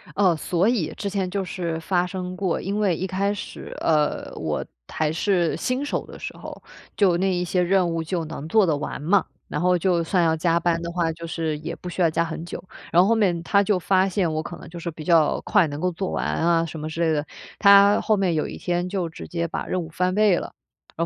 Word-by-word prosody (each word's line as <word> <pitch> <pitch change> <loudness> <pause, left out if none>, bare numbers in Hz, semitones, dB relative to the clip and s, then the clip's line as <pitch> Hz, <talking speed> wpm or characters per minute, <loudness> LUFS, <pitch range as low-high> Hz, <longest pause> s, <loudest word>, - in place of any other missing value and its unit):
哦， 190 -4 +4
所 175 +4 0
以 215 -11 0
之 200 - -3
前 195 -2 -2
就 195 +1 -2
是 170 -3 -3
发 175 +2 +1
生 180 0 -5
过， 185 -2 -1
因 200 +3 -2
为 195 -5 +2
一 185 - -3
开 195 +2 0
始， 205 - -8
呃， 150 -2 +1
我 - - -3 0.2
还 155 -1 -1
是 175 0 +1
新 255 +3 -1
手 - - -2
的 - - -11
时 - - -6
候， - - -9 0.3
就 185 -4 +3
那 190 +1 +1
一 180 0 0
些 180 +1 0
任 185 0 +3
务 165 -1 -2
就 170 +1 -2
能 155 -1 -7
做 215 +4 +4
得 160 -4 +1
完 145 -1 -5
嘛， 190 +5 +3 0.2
然 - - -3
后 180 0 +3
就 175 -1 +1
算 175 +1 +1
要 160 -1 +3
加 170 +1 +1
班 170 -1 0
的 170 - -4
话， 170 -2 0
就 165 +1 -8
是 160 -2 -2
也 - - -5
不 180 - -8
需 180 - -3
要 165 - +5
加 165 - +1
很 165 0 -5
久。 170 - -7 0.3
然 175 - +6
后 190 - +4
后 230 - +4
面， 185 -6 +1
他 200 +3 +3
就 200 -1 +2
发 190 +1 +2
现 185 -3 0
我 155 - -1
可 175 - -8
能 - - -12
就 170 - -8
是 170 - -4
比 155 0 -9
较 160 -2 +3
快 170 - +3
能 145 0 -6
够 180 +2 0
做 185 +3 -3
完 - - -2
啊 165 0 +2
什 160 0 -7
么 155 - -4
之 165 +2 -4
类 165 -1 +3
的， 150 -1 0 0.3
他 200 0 +7
后 215 - +2
面 190 -3 +1
有 155 - 0
一 - - -7
天 175 0 -1
就 180 -3 -2
直 165 - -9
接 170 -1 -2
把 - - -4
任 185 - -1
务 160 - -9
翻 180 +2 0
倍 210 -4 +4
了， - - -6 0.4
然 165 - 0
175 Hz, 275 characters per minute, -24 LUFS, 165-190 Hz, 0.4 s, 他